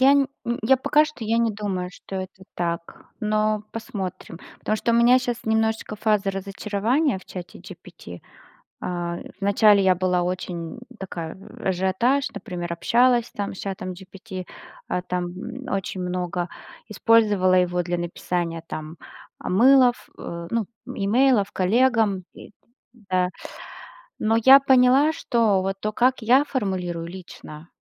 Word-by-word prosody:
я 270 +2 +6
не 280 -1 +3 0.4
я 265 +4 +5
пока 300 +4 +3
что 300 -7 -8
я 225 +2 +1
не 230 -1 +2
думаю, 190 -3 -3
что 195 - -8
это 190 0 -7
так, 170 -1 -4
но 215 -1 0
посмотрим. 195 -7 -6 0.2
Потому 215 - -1
что 235 +2 0
у - - +3
меня 240 +2 +6
щас 245 -2 -3
немножечко 220 -1 0
фаза 210 -2 +1
разочарования 205 +6 -1
в - - -16
Чате 180 -1 -9
GPT. 175 - -12 0.6
А 175 -1 -3 0.2
вначале 200 0 +5
я 185 -1 +4
была 180 0 +1
очень 180 +2 -4 0.2
такая 170 -3 -6 0.3
ажиотаж, 190 +10 +1
например, 175 -4 -5
общалась 240 +6 +2
там 200 -1 -4
с - - -11
Чатом 185 -2 -5
GPT, 190 +1 -9 0.4
э, 180 - -1
там 180 -1 -1 0.4
очень 195 -1 -3
много. 180 -1 -3 0.4
Использовала 210 -4 +3
его 180 -1 +2
для 175 0 -2
написания, 170 -1 -3
там, 155 +1 -7 0.4
мылов, 245 +5 +4
ну, 170 +6 -4 0.2
имейлов 215 +1 +2
коллегам, 215 -1 +2
и - - -13 0.4
да. 185 -5 -1 0.9
Но 220 +1 +2
я 270 +1 +9
поняла, 265 +3 +5
что 230 -10 +1
вот 195 0 -2
то, 215 0 -2
как 250 +1 +2
я 255 +6 +5
формулирую 185 - -3
лично, 170 -3 -11
195 Hz, 135 wpm, -23 LUFS, 180-230 Hz, 0.9 s, я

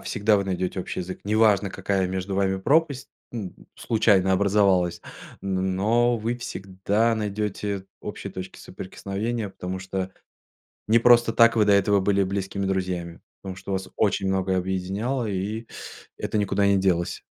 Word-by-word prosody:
всегда 105 0 +2
вы 100 - 0
найдете 95 0 -2
общий 90 - -4
язык. 90 +1 -6
Неважно, 105 -2 +3
какая 95 -2 -1
между 95 +1 -3
вами 95 -1 +1
пропасть, 145 +4 +1 0.2
м, 105 -6 -5 0.2
случайно 100 -4 +2
образовалась, 95 -2 +2 0.4
н 95 -1 -1
но 120 +4 +2
вы 115 +2 -2
всегда 100 +1 -1
найдете 105 -2 -3
общие - - -7
точки 95 0 -7
соприкосновения, 100 +4 -4
потому 95 0 -5
что 95 0 -4 0.8
не 115 +2 +5
просто 120 -1 +5
так 115 +1 +5
вы 110 - +4
до 100 - +4
этого 100 0 +4
были 100 0 +2
близкими 100 +1 -3
друзьями. 90 -3 -3 0.2
Потому 95 -1 -6
что 100 - -8
вас 95 0 -3
очень 100 -2 +1
многое 95 -1 +1
объединяло, 95 +7 -2
и 105 +3 -3 0.5
это 110 - -2
никуда 100 0 +1
не 100 - +4
делось. 90 -3 0
100 Hz, 150 wpm, -25 LUFS, 95-110 Hz, 0.8 s, не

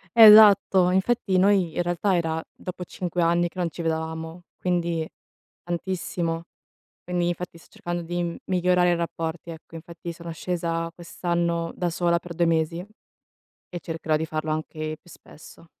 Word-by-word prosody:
Esatto, 205 -4 +8
infatti 190 0 +1
noi, 190 -3 +3
in 175 - +1
realtà, 175 +2 +1
era 160 -1 -1
dopo 180 -1 -7
5 180 0 -3
anni 170 +1 +3
che 185 - -10
non 175 -2 0
ci 170 - -7
vedevamo, 160 +1 -3 0.2
quindi 170 -3 -1 0.6
tantissimo. 170 -1 -3 0.6
Quindi, 175 -1 -1
infatti, 175 0 -4
sto - - -20
cercando 175 0 -4
di 175 0 -3
migliorare 180 -1 +3
i - - +2
rapporti, 165 0 -4
ecco. 165 0 -12
Infatti 170 +1 -8
sono 170 0 -9
scesa 165 0 -2
quest'anno 170 -1 -2
da 175 -1 -1
sola 170 0 +1
per 170 0 -9
2 170 0 +2
mesi 165 +2 0 0.8
e 175 - -6
cercherò 160 -1 -1
di 160 - -1
farlo 155 0 -3
anche 155 0 -3
più 175 - -19
spesso. 165 +2 -15
170 Hz, 150 wpm, -25 LUFS, 165-180 Hz, 0.8 s, Esatto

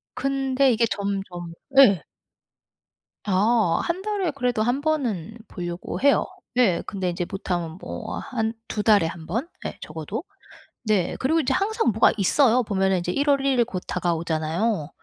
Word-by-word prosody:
근데 270 -1 +1
이게 230 0 +3
점점 195 -4 -4 0.2
예. 205 - +7 1.2
아 205 -1 +2
1 345 +2 -2
달에 400 -4 -1
그래도 250 -5 -1
1 245 +4 0
번은 235 - -1
보려고 175 -2 -5
해요. 280 +1 +4 0.3
예, 210 -9 +3
근데 190 -3 -2
인제 175 0 -2
못하면 175 -3 -3
뭐 - - -6
한 225 -4 -2
2 210 - -3
달에 205 -5 +5
1 165 0 -7
번 230 - -2 0.2
예. - - -5
적어도. 160 - -5 0.6
네. 210 -6 +1
그리고 315 +5 +2
인제 265 -2 0
항상 395 - +1
뭐가 220 - +4
있어요. 245 +5 +4
보면은 190 -3 +1
이제 175 +1 -2
1 285 +7 -1
월 275 -1 +4
1 270 -2 +2
일 235 - +4
곧 190 -6 -5
다가오잖아요. 165 +1 -1
215 Hz, 255 characters per minute, -24 LUFS, 180-265 Hz, 1.2 s, 예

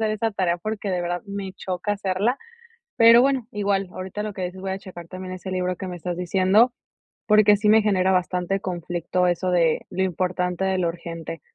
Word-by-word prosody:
hacer 220 -1 +1
esa 215 +1 -1
tarea, 180 -3 0
porque, 215 +1 -4
de 180 -1 -1
verdad, 175 0 -2
me 200 -1 -5
choca 185 +2 -3
hacerla. 200 +5 0 0.6
Pero 230 +1 +8
bueno, 265 -4 +1
igual 200 -2 0
ahorita 190 +3 -5
lo 210 0 -4
que 190 - -5
dices, 180 +1 -6
voy 190 0 -4
a 190 - -3
checar 175 -3 -11
también 185 0 -7
ese 185 +1 -7
libro 180 -1 -1
que 190 - -6
me 180 - -5
estás 175 +1 -4
diciendo, 190 +6 +3 0.6
porque 210 -1 +6
sí 210 +1 +1
me 220 +1 +6
genera 190 -3 +2
bastante 180 +1 0
conflicto 175 0 -1
eso 180 +1 0
de 165 -3 +2
lo 190 - -1
importante 180 0 -1
de 190 0 +1
lo 175 -2 +1
urgente. 165 -1 -7
185 Hz, 205 wpm, -23 LUFS, 180-205 Hz, 0.6 s, Pero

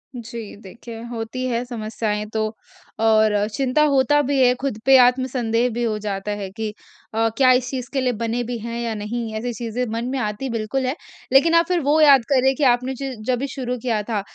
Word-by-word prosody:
जी। 235 -2 -7
देखिए, 225 +3 -10
होती 235 +2 -5
हैं 240 -1 -1
समस्याएँ 215 -3 -3
तो 220 - 0 0.6
और 215 -2 +3
चिंता 270 +3 +2
होता 290 +1 +3
भी 280 0 0
है 250 - +5
खुद 270 -6 -2
पे 270 0 +7
आत्मसंदेह 245 -2 +2
भी 240 +2 -2
हो 220 -2 0
जाता 205 -1 -4
है 195 - -4
कि 220 +2 -4 0.4
अ, 225 +1 +2
क्या 260 -2 +6
इस 250 0 +2
चीज़ 255 -1 -5
के 270 - +1
लिए 250 -1 +1
बने 230 +2 -2
भी 240 0 -4
हैं 235 +1 -5
या 230 -1 -2
नहीं 220 +2 -4
ऐसी 240 +3 -3
चीज़ें 235 +1 -3
मन 230 +1 -2
में 270 - -2
आती 215 +4 -3
बिल्कुल 230 +3 -2
हैं। 255 +3 -1 0.4
लेकिन 285 +5 +5
आप 335 0 +5
फिर 360 -1 +1
वो 295 +3 +3
याद 275 -5 +6
करें 265 0 +4
कि 290 - -2
आपने 250 0 +2
ज 270 -1 -3
जभी 255 +2 0
शुरू 255 -2 -4
किया 225 -4 0
था 210 -1 -2
240 Hz, 210 wpm, -22 LUFS, 225-260 Hz, 0.6 s, पे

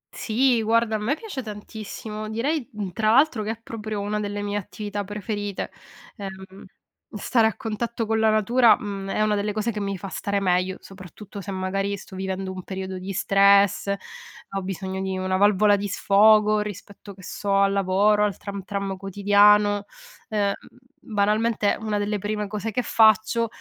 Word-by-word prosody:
Sì, 240 +1 +2
guarda, 225 0 +2
a - - -1
me 240 +8 0
piace 390 - -6
tantissimo, 215 0 -7
direi 265 +5 -1
mh, 205 -3 -4
tra 215 +4 0
l'altro 270 -3 +4
che 210 - -4
è 225 0 -4
proprio 215 -2 -5
una 210 +1 -2
delle 205 0 -3
mie 205 0 -2
attività 205 +1 -5
preferite, 205 0 -4 0.5
uhm, 190 -1 -9 0.5
stare 220 +2 +2
a 220 - -2
contatto 230 0 -3
con 220 0 0
la 220 0 +4
natura, 230 +3 +4
mhmm, 195 -2 -5
è 215 - +1
una 215 0 +2
delle 205 0 -1
cose 215 +2 -1
che 210 - -5
mi 200 -1 -3
fa 195 +2 -7
stare 200 +1 -2
meglio, 185 0 +1
soprattutto 195 +2 -11
se, 200 - -9
magari, 195 +1 -2
sto 190 - -12
vivendo 190 0 -3
un 185 - -6
periodo 190 0 -5
di 190 +2 -6
stress, 200 +1 +4 0.6
ho 195 - -3
bisogno 190 0 -4
di 190 -1 -2
una 185 0 -1
valvola 205 +1 +4
di 200 0 -3
sfogo 210 +2 +4
rispetto, 200 -1 -7
che 190 - -15
so, 200 +2 -2
al 200 0 +4
lavoro, 200 +2 +3
al 205 -2 0
tram 200 -1 -6
tram 195 0 -3
quotidiano, 205 +1 +4 0.4
uhm, 205 -2 +1 0.5
banalmente, 215 -1 +1
una 215 -1 -1
delle 205 0 -1
prime 210 +1 -2
cose 210 +2 -4
che 245 +3 -1
faccio 220 +1 +3
205 Hz, 175 wpm, -24 LUFS, 195-215 Hz, 0.6 s, l'altro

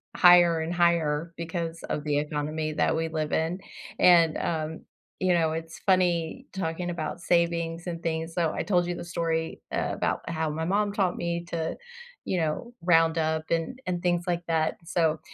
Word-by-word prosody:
higher 175 -2 +7
and 160 +2 -2
higher 170 -2 +1
because 165 0 -4
of 150 - -3
the 145 -1 0
economy 155 +1 -2
that 150 - +1
we 165 0 0
live 155 -1 -3
in, 165 +4 0 0.4
and, 170 -3 +6
um, 160 -1 -2 0.4
you 185 -1 +3
know, 160 -2 +2
it's 165 0 -6
funny 185 +5 +2
talking 175 -1 -3
about 170 0 -4
savings 170 0 0
and 170 -1 -5
things. 165 0 -2
So, 165 -3 +1
I - - -2
told 175 -3 +2
you 175 0 -2
the - - -6
story 165 -1 -2
eh - - -1
about - - -2
how 160 -2 -1
my 160 +2 -3
mom 205 +3 +1
taught 195 -3 0
me 170 0 -3
to 165 -1 -2 0.5
you 185 - 0
know, 165 +10 -2
round 165 -1 +4
up 160 0 0
and 170 +10 -1
and 175 -1 -2
things 175 -1 +1
like 175 -1 0
that. 160 -1 +1
So, 165 -2 +1
165 Hz, 180 wpm, -27 LUFS, 160-175 Hz, 0.5 s, higher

